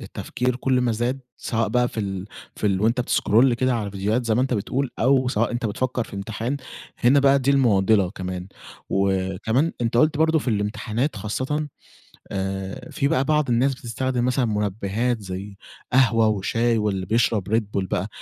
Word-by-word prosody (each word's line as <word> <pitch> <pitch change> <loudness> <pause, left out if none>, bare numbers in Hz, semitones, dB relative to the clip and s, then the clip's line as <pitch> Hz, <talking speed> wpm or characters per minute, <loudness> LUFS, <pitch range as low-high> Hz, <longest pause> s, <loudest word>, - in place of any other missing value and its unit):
التفكير 125 0 -3
كل 130 0 +1
ما 120 -2 +1
زاد 120 +4 -1 0.2
سواء 115 -2 -1
بقى 125 +2 +2
في 115 - -4
ال 95 -2 -4 0.3
في 105 - -1
ال 95 -1 +1
وأنتَ 115 +4 +2
بتسكرول 120 0 +3
كده 130 +1 +1
على 105 -3 -2
فيديوهات 105 +5 -1
زي 110 - +2
ما 125 - +2
أنتَ 130 -2 0
بتقول 125 +5 -1
أو 130 +1 +3
سواء 115 -1 0
أنتَ 120 -1 -1
بتفكر 125 +3 -2
في 100 - -10
إمتحان، 110 +6 -3 0.4
هنا 130 +3 +4
بقى 140 0 +5
دي 135 +1 +1
المعضلة 105 -7 +3
كمان. 90 0 -6 0.4
وكمان 95 - +1
أنتَ 115 0 0
قُلت 150 +4 +4
برضه 160 0 +3
في 135 - -4
الإمتحانات 110 +5 -1
خاصةً، 130 +9 -2 0.6
آآ، 95 0 -4
في 140 - 0
بقى 140 -3 +2
بعض 150 -2 +1
الناس 130 +3 +2
بتستخدم 125 +1 -2
مثلًا 125 0 +1
منبهات 105 +2 -1
زي 95 +1 -7 0.4
قهوة 115 -4 +4
وشاي 115 +3 +1
واللي 100 -3 -1
بيشرب 110 -1 +1
Red 115 - +3
Bull 100 -2 -3
بقى. 100 -1 -1
115 Hz, 175 wpm, -23 LUFS, 100-130 Hz, 0.6 s, بقى